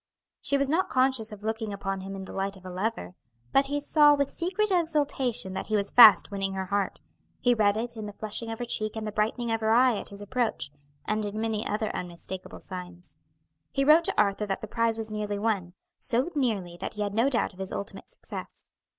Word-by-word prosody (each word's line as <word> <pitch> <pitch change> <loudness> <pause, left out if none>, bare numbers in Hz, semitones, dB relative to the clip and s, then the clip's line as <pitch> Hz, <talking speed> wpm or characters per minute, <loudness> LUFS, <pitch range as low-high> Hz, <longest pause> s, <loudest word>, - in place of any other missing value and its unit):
She 280 - +2
was 280 0 +2
not 330 +6 +1
conscious 255 -4 +2
of 210 -1 -10
looking 220 0 -2
upon 195 -1 -3
him 195 +1 -6
in 190 -1 -6
the - - -10
light 195 0 -2
of 185 - -17
a 185 - -6
lover, 200 +2 -3 0.4
but 275 0 +4
he 290 +1 -1
saw 295 0 +5
with 280 -1 0
secret 385 +5 -1
exultation 290 - +1
that - - -4
he 215 - 0
was 200 -1 0
fast 220 -6 +8
winning 195 -1 -2
her 190 0 -2
heart; 200 +1 -1 0.4
he 245 - +3
read 210 -2 +3
it 235 +1 -3
in 215 -1 -6
the - - -6
flushing 215 +2 -3
of 225 - -4
her 245 - -4
cheek 215 -2 -2
and 220 -1 -4
the 215 - -3
brightening 225 +3 -1
of 225 0 0
her 220 - +1
eye 240 0 +4
at - - -5
his 200 - -11
approach, 215 - -2 0.3
and 215 0 0
in 205 +1 -3
many 220 -1 -1
other 215 +1 -2
unmistakable 180 +1 -7
signs. 180 -1 -9 0.5
He 275 - +1
wrote 315 +3 +6
to - - 0
Arthur 205 0 +2
that 195 - -2
the 220 - -6
prize 230 +1 0
was 220 -1 -2
nearly 210 -1 -2
won; 200 -5 -1 0.3
so 255 +8 0
nearly 210 - -1
that - - -4
he 210 - -1
had 205 -1 -3
no 230 +6 +3
doubt 235 -5 0
of 185 - -18
his 190 -1 -4
ultimate 200 - -5
success. - - -10
215 Hz, 230 wpm, -27 LUFS, 200-245 Hz, 0.5 s, fast